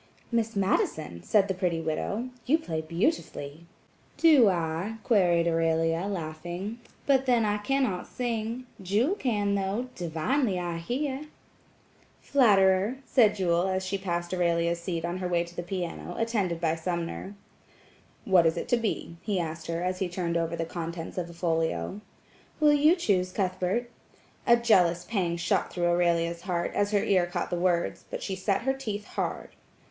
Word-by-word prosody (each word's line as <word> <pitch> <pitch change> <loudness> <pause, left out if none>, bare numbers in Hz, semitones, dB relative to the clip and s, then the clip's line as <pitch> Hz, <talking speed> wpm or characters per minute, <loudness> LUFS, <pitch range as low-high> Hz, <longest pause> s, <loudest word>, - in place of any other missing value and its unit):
"Miss 230 -1 0
Madison," 155 - 0
said 200 - +3
the 190 - 0
pretty 180 -3 -1
widow, 165 +9 -2 0.2
"you 305 +5 +5
play 160 - -3
beautifully." 165 - -2 0.5
"Do 295 -10 +6
I?" 170 +4 -2
gueried 175 -7 +3
Aurelia, 165 +1 +1
laughing, 175 +4 -5 0.3
"but 270 -1 +3
then 240 -3 +4
I 210 0 0
cannot 225 -5 0
sing, 235 0 -3 0.2
Jewel 210 - +1
can, 210 - 0
though–divinely, 200 - -1
I 175 -1 -3
hear." 270 - -3 0.9
"Flatterer!" 205 -3 +4
said 220 -6 +4
Jewel 175 -2 +1
as 190 0 -1
she 195 +1 -2
passed 175 -2 -3
Aurelia's 170 -1 +1
seat 170 -1 -3
on 175 +1 -2
her 185 - -2
way 175 -1 +1
to 170 0 -13
the - - -3
piano, 175 -1 -5
attended 205 -7 0
by 165 -2 +1
Sumner. 170 +3 -4 0.9
"What 180 -4 +5
is 160 - 0
it - - -3
to 245 - +4
be?" 210 -6 -3
he 200 -4 -1
asked 160 -1 -4
her 165 +1 -2
as 185 0 -1
he 190 - -1
turned 170 -1 -2
over 165 0 0
the 165 0 -2
contents 165 +1 -5
of 170 -1 -4
a - - -10
folio. 165 - -1 0.6
"Will 300 -1 +5
you 300 +4 +5
choose, 190 - +1
Cuthbert?" 190 +5 -1 0.6
A 235 -1 +7
jealous 180 -7 +3
pang 180 -6 0
shot 175 +2 0
through 175 -1 -1
Aurelia's 170 -1 +1
heart, 175 -2 -2
as 205 0 +1
her 205 -1 +2
ear 185 -3 +3
caught 175 +1 -3
the - - +1
words, 175 -1 0
but - - -5
she 190 - -3
set 195 +3 0
her 265 +1 +2
teeth 215 -6 -5
hard. - - -3
185 Hz, 165 wpm, -28 LUFS, 170-215 Hz, 0.9 s, A